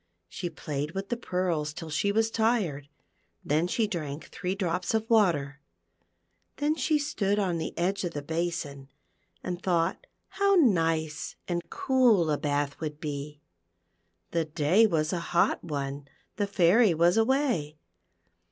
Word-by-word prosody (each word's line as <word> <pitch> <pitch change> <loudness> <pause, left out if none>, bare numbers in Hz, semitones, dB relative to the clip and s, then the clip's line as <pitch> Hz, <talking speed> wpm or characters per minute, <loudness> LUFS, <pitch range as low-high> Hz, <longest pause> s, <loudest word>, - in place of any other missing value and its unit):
She 175 - -5
played 150 -2 -4
with 195 +1 -4
the 240 - 0
pearls 180 -8 -1
till 165 -1 -8
she 160 +7 +1
was 225 +1 +1
tired, 205 - 0 0.6
then 155 +2 +1
she 220 +5 +1
drank 155 -7 -4
three 180 +1 -3
drops 180 +1 -1
of 220 0 0
water, 155 -11 +2 1.0
then 295 +2 +1
she 300 +1 +1
stood 210 -9 0
on 180 -5 0
the - - -5
edge 190 +4 0
of 175 -2 -3
the 145 - -4
basin, 160 -4 -3 0.5
and 180 0 -4
thought 175 0 0 0.2
how 400 0 +2
nice 165 - +1
and 175 -1 -1
cool 255 - +3
a 150 - +1
bath 145 -1 -1
would 150 -2 -5
be. 145 -1 -5 0.9
The 165 -1 0
day 160 +8 +3
was 160 -3 0
a 175 - 0 0.2
hot - - +3
one, 140 -3 -4 0.3
the 205 -1 -1
Fairy 195 +1 +4
was 170 +3 +4
away. 225 - +1
175 Hz, 145 wpm, -28 LUFS, 150-210 Hz, 1.0 s, Fairy